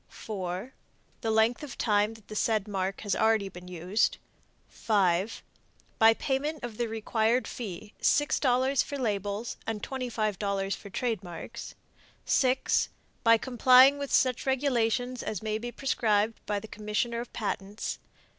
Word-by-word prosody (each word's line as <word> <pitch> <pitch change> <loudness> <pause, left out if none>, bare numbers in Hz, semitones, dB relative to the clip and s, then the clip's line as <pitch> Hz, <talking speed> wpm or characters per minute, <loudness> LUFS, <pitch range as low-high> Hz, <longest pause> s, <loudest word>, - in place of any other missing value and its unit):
4. 195 +3 -5 0.5
The 225 - -1
length 220 +2 +3
of 290 -5 -8
time 210 0 +2
that 220 -2 -17
the 215 - -8
said 215 -1 +1
mark 195 -1 -2
has 205 -2 -1
already 220 -3 +2
been 180 -1 -11
used. 180 +4 0 0.5
5. 195 -1 +1 0.6
By 225 0 +7
payment 290 +4 -2
of 235 -3 -6
the 240 - 0
required 225 +1 0
fee 210 -2 -7
$6 270 -2 +3
for 285 - -5
labels 205 -2 -2
and 220 -2 -3
$25 210 -6 -2
for 200 - -11
trademarks. 205 -2 -4 0.5
6. 260 -1 +2 0.3
By 230 0 +6
complying 260 +3 +6
with 280 -1 -4
such 255 0 +2
regulations 250 -2 +1
as 215 -1 -4
may 215 0 -1
be 240 +2 -5
prescribed 225 -5 0
by 205 -1 0
the 220 - -10
Commissioner 215 +3 -2
of 240 - -9
Patents. 205 -1 -4
220 Hz, 135 wpm, -29 LUFS, 205-245 Hz, 0.6 s, By